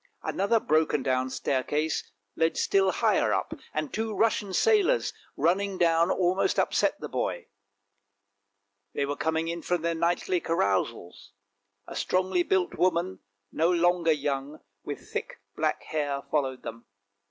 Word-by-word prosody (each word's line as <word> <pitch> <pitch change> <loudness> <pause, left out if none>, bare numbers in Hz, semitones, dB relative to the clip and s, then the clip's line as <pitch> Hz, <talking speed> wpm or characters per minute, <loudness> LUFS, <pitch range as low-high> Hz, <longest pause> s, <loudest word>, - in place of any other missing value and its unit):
Another 200 +4 +1
broken 155 -5 +1
down 130 0 +1
staircase 145 +4 -1 0.3
led 165 0 +1
still 195 -1 +3
higher - - +2
up, - - -2 0.2
and 290 - -3
two 220 -1 -2
Russian 210 -1 +1
sailors 435 - +3 0.2
running 195 +3 +1
down 170 0 +3
almost 185 0 +1
upset - - +1
the - - -5
boy. - - -3 1.5
They 140 - +1
were 145 +1 -2
coming 165 +2 -1
from 175 -1 -1
their 170 0 +1
nightly 175 +2 0
carousals. 100 - -1 0.5
A - - -9
strongly 185 -1 +1
built 180 +1 +1
woman, 185 +1 0 0.3
no 165 +2 +2
longer 175 -1 +3
young, 145 0 -2 0.2
with - - -7
thick - - -4 0.2
black - - -1
hair, 145 -3 -2
followed 135 -4 0
them. 115 +1 -8
170 Hz, 130 wpm, -27 LUFS, 145-185 Hz, 1.5 s, still